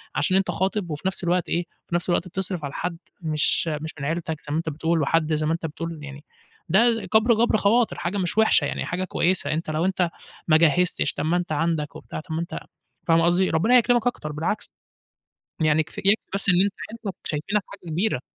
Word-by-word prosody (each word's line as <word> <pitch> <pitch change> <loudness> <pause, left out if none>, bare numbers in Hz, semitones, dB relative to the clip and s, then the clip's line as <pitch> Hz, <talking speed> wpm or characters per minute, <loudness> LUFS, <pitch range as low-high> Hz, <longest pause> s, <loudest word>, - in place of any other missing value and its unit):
عشان 190 -1 +2
أنت 195 - +1
خاطب 190 -1 -1
وفي 150 - -5
نفس 190 -1 -3
الوقت 175 0 0
إيه 175 +1 0 0.2
في 170 - -2
نفس 175 +1 -1
الوقت 175 +1 +1
بتصرف 185 -2 -3
على 140 - -6
حد 170 0 -3 0.2
مش 155 +1 +1
مش 155 0 -3
من 140 - -4
عيلتك 160 0 -3
زي 145 - -8
ما 150 - 0
أنت 165 0 -2
بتقول 160 +2 0
وحد 155 +2 +1
زي 155 0 0
ما 160 - +1
أنت 165 - -3
بتقول 165 +1 -5
يعني 145 +1 -9 0.5
ده 225 +4 +3
كبر 220 +2 +5
جبر 225 0 +3
خواطر 220 +3 +2
حاجة 185 +4 -2
مش 185 +2 -2
وحشة 220 - +5
يعني، - - -3
حاجة 180 +2 -2
كويسة 185 0 0
أنت 160 0 -3
لو 155 +3 0
أنت 185 -2 +1 0.4
ما 155 - +6
جهزتش 170 +2 +2
طَب 145 - -3
ما 170 +3 +2
أنت 175 -2 -3
عندك 155 -1 -1
وبتاع، - - -7
طَب 160 0 -8
ما 165 - -1
أنت 170 - -5 0.5
فاهمة 165 0 +4
قصدي 180 +2 +3
ربنا 220 +10 +4
يكرمك 240 0 +3
أكتر 155 -11 -3
بالعكس. 160 +8 -3 0.9
يعني 155 0 +3
كف 155 - -15
يكفي 200 +3 +4 0.2
بس 200 0 +2
إن 180 - +6
أنت 200 0 +1 0.2
عيلتك 220 -4 -6
شايفينك 180 +7 -1
حاجة 170 - -11
كبيرة. 175 - 0
170 Hz, 215 wpm, -24 LUFS, 155-195 Hz, 0.9 s, ما